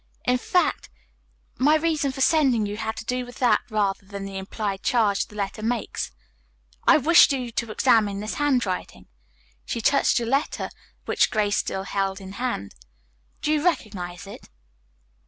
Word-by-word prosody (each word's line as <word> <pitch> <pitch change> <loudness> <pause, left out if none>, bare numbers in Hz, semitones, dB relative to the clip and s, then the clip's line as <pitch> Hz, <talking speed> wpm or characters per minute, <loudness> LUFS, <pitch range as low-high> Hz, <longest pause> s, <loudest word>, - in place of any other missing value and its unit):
In 250 0 +2
fact, 360 +7 0 0.7
my 295 +4 +5
reason 310 -3 +1
for 270 - -6
sending 260 -5 +3
for - - -4
you 205 - -5
had 220 0 -3
to - - -6
do 250 +1 -1
with 245 0 -11
that, 235 -5 +3
rather 205 -3 0
than 195 0 -7
the 195 -1 -5
implied 195 0 -4
charge 215 -5 +1
the 210 - -15
letter 200 +1 -4
makes. 230 +1 -2 0.8
I - - +8
wish 335 +3 +6
you 250 -3 -2
to 230 0 -3
examine 215 -3 +2
this 215 +1 -4
handwriting," 245 -10 -1 0.6
she - - -4
touched 280 +5 +3
the 235 - 0
letter 275 +5 -1 0.3
which - - +2
Grace 210 -1 +1
still 190 - -2
held 195 0 -2
in 190 -1 -9
hand. 245 - -3 0.7
"Do 300 - +1
you 305 -1 +1
recognize 200 - -2
it?" 200 - -11
225 Hz, 165 wpm, -24 LUFS, 200-260 Hz, 0.8 s, I